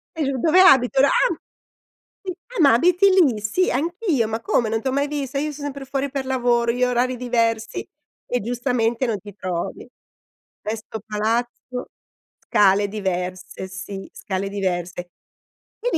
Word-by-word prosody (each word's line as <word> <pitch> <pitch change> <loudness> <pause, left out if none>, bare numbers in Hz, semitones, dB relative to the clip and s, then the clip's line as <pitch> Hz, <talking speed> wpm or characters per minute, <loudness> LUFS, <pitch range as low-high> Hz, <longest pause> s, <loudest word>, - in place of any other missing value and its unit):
E 325 - -3
io: 275 -2 0
"Dove 325 +7 +4
abito?" 265 -7 +6
Era 275 - +6
"Ah! 320 +3 +2 0.9
Sì. 370 - -2 0.2
Ah - - 0
ma 280 -4 +7
abiti 360 - +4
lì? 310 - +4
Sì. 220 - +1
Anch'io, 330 - 0
ma 225 +1 -3
come 225 -1 +1
non 225 0 0
t'ho 265 - 0
mai 280 +1 +1
vista. 285 -2 -3
Io 300 +2 -1
son 290 0 -8
sempre 280 -1 -5
fuori 275 +1 -2
per 275 -1 -3
lavoro. 245 -2 +1
Io 250 +1 +1
ho - - 0
orari 250 +1 +1
diversi." 230 -2 -1 0.4
E 245 - -1
giustamente 240 +1 0
non 225 -3 -1
ti 205 0 -11
trovi. 180 -3 -4 0.8
Stesso 220 +1 -5
palazzo, 235 +4 -2 0.6
scale 205 0 +4
diverse, 185 -2 -4
sì, 195 +1 -7
scale 195 0 -3
diverse. 180 -3 -3 0.7
Benissimo. 480 -6 0
240 Hz, 160 wpm, -22 LUFS, 210-275 Hz, 0.9 s, ma